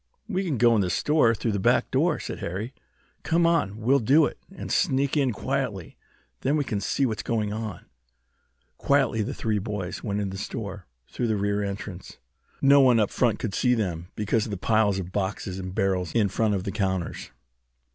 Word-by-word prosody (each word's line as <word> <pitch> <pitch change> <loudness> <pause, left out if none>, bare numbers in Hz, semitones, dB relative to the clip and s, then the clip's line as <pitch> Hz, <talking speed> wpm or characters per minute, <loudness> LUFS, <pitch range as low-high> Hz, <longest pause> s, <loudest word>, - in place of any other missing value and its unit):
"We 195 -3 -1
can 160 -8 -1
go 120 0 +5
in 110 - +3
the 90 - 0
store 120 - +3
through 115 +1 -1
the 100 - -1
back - - +2
door," - - +2
said - - -6
Harry. 105 +9 -4 0.5
"Come 170 +1 +2
on, 165 -12 +1
we'll 125 +6 +3
do 140 +7 +5
it, - - -5
and 195 - -7
sneak 140 -6 +1
in 140 -4 +2
quietly! 105 - -3 0.4
Then 140 +4 +1
we 145 - +1
can 105 -6 -3
see 135 - 0
what's 110 -4 -2
going 110 -3 -1
on." 110 -2 -5 0.9
Quietly 135 -5 +2
the 105 - -3
three 110 -2 -1
boys 100 -3 -5
went 105 -2 -2
into 95 -2 -3
the - - -5
store 100 -6 -6 0.2
through 120 - -2
the 110 -2 +1
rear 100 +1 0
entrance. 100 -2 -6 0.5
No 140 +1 +7
one 125 -3 +5
up 105 - +1
front 120 -4 +1
could 105 - -4
see 125 +3 +2
them 90 -6 -2
because 105 +1 0
of - - -7
the 100 - -3
piles 105 0 +2
of 90 -1 -5
boxes 95 -1 -3
and 95 0 -6
barrels 95 -3 0
in 105 -4 +3
front 105 +1 +1
of 95 - -2
the 100 - -3
counters. 95 -4 -2
110 Hz, 200 wpm, -26 LUFS, 100-125 Hz, 0.9 s, No